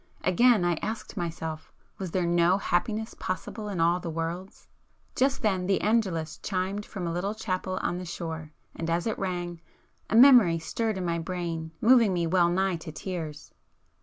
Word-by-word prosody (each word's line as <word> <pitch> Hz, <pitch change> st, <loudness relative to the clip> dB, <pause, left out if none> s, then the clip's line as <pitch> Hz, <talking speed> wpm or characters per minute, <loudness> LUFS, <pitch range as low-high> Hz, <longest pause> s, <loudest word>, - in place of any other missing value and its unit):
Again 210 Hz, +1 st, +4 dB
I 175 Hz, -2 st, +1 dB
asked 220 Hz, 0 st, -5 dB
myself—Was 165 Hz, +2 st, -6 dB
there 180 Hz, +1 st, 0 dB
no 175 Hz, +2 st, +3 dB
happiness 215 Hz, +4 st, -1 dB
possible 205 Hz, +3 st, -5 dB
in 190 Hz, -4 st, -3 dB
all 170 Hz, +2 st, +3 dB
the 170 Hz, -, -5 dB
world? 165 Hz, +4 st, -4 dB, 0.6 s
Just 270 Hz, 0 st, +1 dB
then 190 Hz, -4 st, +1 dB
the 195 Hz, -, +2 dB
Angelus 190 Hz, -8 st, 0 dB
chimed 195 Hz, +2 st, -2 dB
from 190 Hz, -4 st, -5 dB
a 170 Hz, -, -2 dB
little 195 Hz, +5 st, -2 dB
chapel 185 Hz, -3 st, -3 dB
on 175 Hz, -, -1 dB
the 180 Hz, -, -6 dB
shore, 160 Hz, -2 st, -6 dB, 0.2 s
and 165 Hz, 0 st, -4 dB
as 170 Hz, +1 st, 0 dB
it 220 Hz, -, -2 dB
rang, 175 Hz, -3 st, -3 dB, 0.5 s
a -, -, 0 dB
memory 235 Hz, -9 st, +8 dB
stirred 215 Hz, +6 st, -2 dB
in 185 Hz, -, -3 dB
my 170 Hz, -1 st, 0 dB
brain 165 Hz, -2 st, -4 dB
moving 230 Hz, -4 st, +5 dB
me 175 Hz, -1 st, 0 dB
well 170 Hz, +1 st, +3 dB
nigh 190 Hz, 0 st, +1 dB
to 160 Hz, 0 st, -8 dB
tears. 160 Hz, -3 st, -6 dB
180 Hz, 170 wpm, -27 LUFS, 170-205 Hz, 0.6 s, memory